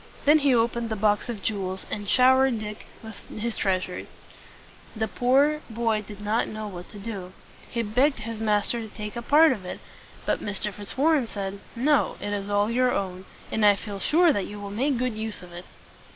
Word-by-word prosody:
Then 300 +2 +7
he 280 -3 +4
opened 235 0 +1
the 220 - -1
box 210 +2 +1
of 220 -4 -5
jewels, 190 -3 -2
and 205 -1 -4
showed 260 -1 +5
Dick 210 -1 -7 0.5
his 230 +1 -2
treasures. 185 -2 -1 0.9
The 220 0 -1
poor 280 +6 +3
boy 225 -1 0
did 210 0 -11
not 215 +3 +1
know 215 0 -5
what 180 -3 -8
to - - -10
do. 195 -4 -6 0.4
He 235 - -1
begged 255 +7 +2
his 225 0 -5
master 215 +2 +1
to 220 - -6
take 210 +1 -7
a 235 - -3
part 305 +6 +6
of 215 -7 -3
it; 180 - -6 0.5
but - - +1
Mr. 205 0 -3
Fitzwarren 270 - +1
said, 200 -2 -5 0.2
"No, 280 +4 +2
it 205 - -3
is 200 0 -3
all 205 +2 +2
your 250 +1 +3
own; 185 -1 -3 0.3
and 220 - 0
I 205 -1 +7
feel 200 0 -7
sure 330 - +4
that 200 - -1
you 205 0 -8
will 200 -1 -6
make 260 +6 0
good 250 -2 -1
use 220 -3 -4
of 175 -1 -12
it." 175 +1 -8
215 Hz, 195 wpm, -26 LUFS, 205-245 Hz, 0.9 s, Then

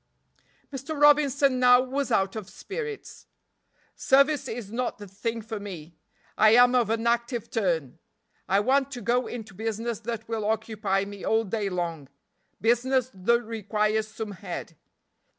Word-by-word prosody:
Mr. 275 +3 -5
Robinson 285 -3 +4
now 250 0 +7
was 265 +2 -2
out 195 +1 +1
of 215 -4 -6
spirits. 440 +1 -7 0.7
"Service 275 +1 +3
is 225 -4 -6
not 245 +2 -2
the 205 - -10
thing 225 +4 -4
for 220 -1 -5
me. 175 -5 -9 0.4
I 215 +1 +7
am 245 +1 +6
of 240 -4 +2
an 225 +1 -1
active 235 0 -1
turn 165 - -1 0.5
I 195 +1 +4
want 270 +4 +2
to 245 - -6
go 245 +2 +1
into 220 -4 -7
business 225 +2 -3
that 230 -1 -5
will 225 -1 -3
occupy 215 -3 -1
me 200 -1 -9
all 220 0 +2
day 210 -1 -2
long 170 -6 -4 0.5
business 250 +3 +1
that 235 +6 +1
requires 215 -1 -1
some 215 -1 -6
head. 180 -4 -7
225 Hz, 150 wpm, -26 LUFS, 205-250 Hz, 0.7 s, now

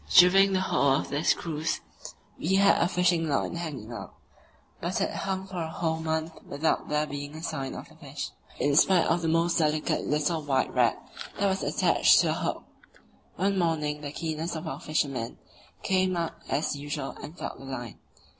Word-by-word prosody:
During 195 +2 +7
the 185 - +2
whole 140 -7 +3
of 135 - -1
this 145 +3 +2
cruise 160 -1 -2 0.6
we 185 +5 +1
had 200 +1 +5
a 170 - +4
fishing 175 -3 +2
line 140 - 0
hanging 140 -9 -5
out, - - -8 0.6
but - - -2
it - - 0
hung 190 0 -3
for 185 -2 -5
a 160 - -3
whole 160 0 -1
month 160 0 -3
without 150 +3 -1
there 150 0 +1
being 145 0 -6
a 160 - -8
sign 135 -5 -3
of - - -9
a - - -15
fish, - - -6 0.3
in 145 0 +2
spite 180 +2 +5
of 170 +1 +1
the 165 - -1
most 165 +1 +2
delicate 155 -1 +1
little 150 +2 +1
white 135 -3 0
rag - - +3 0.4
that 200 - +1
was 190 0 0
attached - - +4
to - - +1
the - - +2
hook. - - -2 0.7
One 195 0 +1
morning 150 -3 0
the 145 -1 -5
keenest 160 +2 -3
of 160 +1 -5
our - - -4
fishermen 135 -6 -2 0.5
came 185 -1 +2
up 170 0 -3
as 150 0 0
usual 145 -1 -4
and 160 +4 -9
felt - - -6
the 135 - -10
line. 120 -4 -6
160 Hz, 190 wpm, -28 LUFS, 145-175 Hz, 0.7 s, During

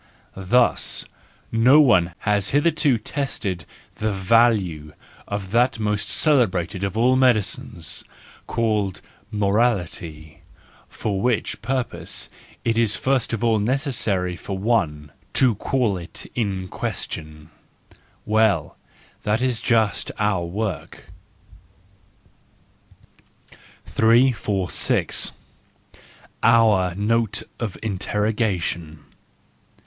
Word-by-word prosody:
—Thus, 105 +6 +1 0.5
no 125 +6 +6
one 90 - +4
has 105 -2 +1
hitherto 145 -2 +2
tested 105 - -4 0.3
the 110 0 -1
value 95 -7 +2 0.3
of 100 -2 -5
that 120 +3 +2
most 105 -1 -1
cele¬ 145 -7 +4
brated 90 0 -4
of 100 +2 -2
all 125 +3 +4
medicines, 110 - 0 0.4
called 105 -5 -1 0.3
morality: 100 -8 -1 0.5
for 100 -3 -3
which 120 -3 -1
purpose 130 +2 -2 0.3
it 115 0 +1
is 110 -2 +2
first 130 -3 0
of 115 -1 -2
all 115 -2 +3
necessary 110 - 0
for 95 +2 -6
one 90 -9 0 0.2
—to 130 -3 +4
call 110 -1 0
it 90 +5 -8
in 95 -5 -2
question, 75 -3 -5 0.7
Well, 110 -1 +1 0.4
that 105 +1 0
is 125 -3 0
just 110 -4 +1
our 105 -5 +1
work.— 100 +4 -5 2.8
346. 110 -5 +2 1.1
Our 110 -6 +4
Note 110 +2 0 0.2
of 115 -5 -4
Interrogation 100 -6 -2
105 Hz, 90 wpm, -22 LUFS, 95-115 Hz, 2.8 s, no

